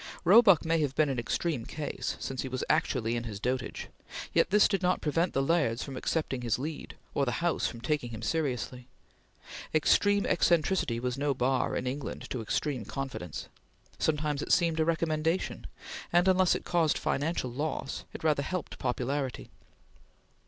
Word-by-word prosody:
Roebuck 195 -3 +7
may 165 0 +2
have 145 -3 -1
been 155 -2 +3
an 130 -3 -1
extreme 125 +2 -1
case, 150 +5 -4
since 135 -1 -3
he - - -4
was 130 0 -3
actually 115 -2 +1
in 120 0 -3
his 105 -3 -6
dotage, 125 +3 -2 0.5
yet - - +3
this 205 +2 +6
did 195 -2 0
not 180 0 +2
prevent 165 +4 0
the 135 - +1
Lairds 135 -7 +1
from 135 - -7
accepting 135 -1 -1
his 120 -2 0
lead, 150 +4 -6 0.2
or 140 - +1
the 120 -3 0
House 170 -1 +1
from 115 - -7
taking 150 -3 -1
him 115 -1 -7
seriously. 125 -4 -2 0.9
Extreme 205 +6 +4
eccentricity 165 -8 +2
was 125 +2 -2
no 140 -1 +1
bar, 130 +1 +1
in - - -2
England, 135 +3 -4
to 125 - -2
extreme 130 +3 -1
confidence; 120 - -5 0.5
sometimes 150 -2 0
it - - -3
seemed 165 -2 +3
a 160 - +3
recommendation; 165 +1 0 0.4
and 175 +2 +4
unless 185 -1 +4
it - - -5
caused 170 -3 +2
financial 145 -3 -1
loss, 145 +1 -3
it - - -9
rather 150 -3 +3
helped 180 +4 -4
popularity. 130 +1 -2
145 Hz, 165 wpm, -30 LUFS, 125-165 Hz, 0.9 s, Roebuck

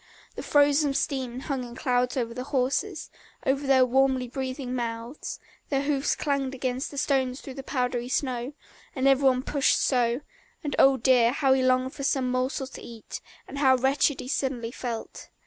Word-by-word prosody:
The - - -6
frozen 290 0 +3
steam 260 -4 -2
hung 270 -3 -3
in 240 -1 -9
clouds 250 +1 0
over 235 -2 -1
the 250 +2 -5
horses, 285 +7 -1 0.3
over 275 +1 0
their 260 -1 +5
warmly 260 0 +2
breathing 260 0 -4
mouths; 235 +2 -4 0.3
their 275 -1 0
hoofs 280 -1 +1
clanged 275 -3 -1
against 255 +1 -2
the 285 - -10
stones 265 -2 0
through 270 - -9
the 270 - -7
powdery 250 -2 -2
snow, 255 0 -2 0.4
and 265 0 +1
every 270 0 +4
one 255 0 0
pushed 285 -1 +2
so, 245 0 +1 0.4
and 290 -2 -2
oh, 270 0 +6
dear, 240 -1 +4
how 270 0 +3
he 265 - +2
longed 255 0 +2
for - - -8
some 270 -2 +1
morsel 255 +2 -1
to 265 - -10
eat, 230 -2 -9 0.3
and 280 - -6
how 265 -2 +5
wretched 265 +2 +1
he - - -8
suddenly 255 -4 -2
felt. 235 -2 -6
260 Hz, 180 wpm, -26 LUFS, 250-275 Hz, 0.4 s, oh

